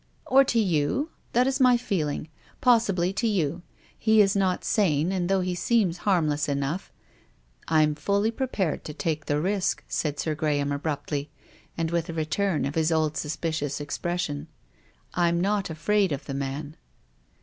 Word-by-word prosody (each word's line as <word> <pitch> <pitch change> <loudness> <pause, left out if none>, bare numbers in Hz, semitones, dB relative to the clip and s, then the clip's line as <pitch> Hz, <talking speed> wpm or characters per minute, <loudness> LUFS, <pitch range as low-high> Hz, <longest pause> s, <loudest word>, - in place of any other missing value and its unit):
" - - -37
Or 270 +1 +6
to 240 - 0
you. 200 - +1 0.2
That 245 +2 +4
is 270 +1 0
my 250 -2 +6
feeling. 160 -11 -2 0.3
Possibly 195 -7 +3
to 230 - 0
you. 175 -5 0 0.3
He 220 -1 +3
is 200 -1 +5
not 190 -2 +1
sane, 170 -5 +2
and 180 -2 -1
though 195 -1 +3
he 180 0 -1
seems 190 -2 +1
harm 175 -5 +3
less 150 0 0
enough 140 +6 -2 0.3
— - - -34
" - - -38
" - - -39
I'm 155 -1 +3
fully 200 +8 0
prepared 220 - -2
to 150 - -6
take 155 -2 -2
the 145 0 +1
risk," 190 +2 0
said 150 -2 -2
Sir 155 - -1
Graham 145 -2 0
abruptly, 145 0 -3 0.5
and 165 -1 -1
with 170 -1 -1
a - - -3
return 160 +3 0
of 140 - -3
his 160 +1 +1
old 155 -1 +1
suspicious 150 -1 -2
expression. 150 0 -3 0.3
" - - -35 0.3
I'm 170 -1 +2
not 200 +1 0
afraid 190 +4 +1
of 140 0 -3
the 140 - -5
man." 140 +3 -4
165 Hz, 180 wpm, -26 LUFS, 150-200 Hz, 0.5 s, Or